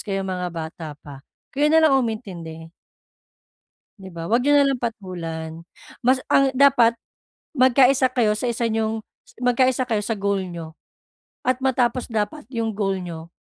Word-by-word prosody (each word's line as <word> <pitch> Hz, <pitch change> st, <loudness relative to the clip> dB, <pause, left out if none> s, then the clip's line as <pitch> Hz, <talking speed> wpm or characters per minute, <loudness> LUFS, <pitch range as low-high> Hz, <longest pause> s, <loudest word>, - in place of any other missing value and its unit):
kayong 195 Hz, -2 st, -3 dB
mga 180 Hz, -1 st, -3 dB
bata 165 Hz, -1 st, -7 dB, 0.2 s
pa, 140 Hz, -2 st, -10 dB, 0.3 s
kayo 290 Hz, +2 st, +2 dB
na 320 Hz, +1 st, +5 dB
lang 310 Hz, -, +5 dB
umintindi. 170 Hz, -9 st, -6 dB, 1.3 s
'Di 190 Hz, -, -10 dB
ba? 165 Hz, 0 st, -6 dB
'Wag 235 Hz, +5 st, +2 dB
niyo 290 Hz, +1 st, +3 dB
nalang 275 Hz, -3 st, +2 dB
patulan. 170 Hz, -7 st, -5 dB, 0.4 s
Mas, 255 Hz, +2 st, +4 dB
ang 275 Hz, -1 st, +4 dB
dapat 240 Hz, -4 st, +5 dB, 0.6 s
magkaisa 260 Hz, +1 st, +4 dB
kayo 235 Hz, -4 st, +2 dB
sa 245 Hz, +2 st, -1 dB
isa 235 Hz, 0 st, -1 dB
niyong 220 Hz, 0 st, -1 dB, 0.4 s
magkaisa 255 Hz, +1 st, +2 dB
kayo 215 Hz, -3 st, 0 dB
sa 220 Hz, 0 st, -2 dB
goal 200 Hz, -1 st, 0 dB
niyo 165 Hz, -3 st, -8 dB, 0.7 s
at 255 Hz, 0 st, +1 dB
matapos 255 Hz, -2 st, 0 dB
dapat 225 Hz, +7 st, -2 dB
yung 230 Hz, -2 st, -2 dB
goal 195 Hz, -2 st, 0 dB
niyo 170 Hz, -1 st, -8 dB
225 Hz, 150 wpm, -22 LUFS, 180-255 Hz, 1.3 s, na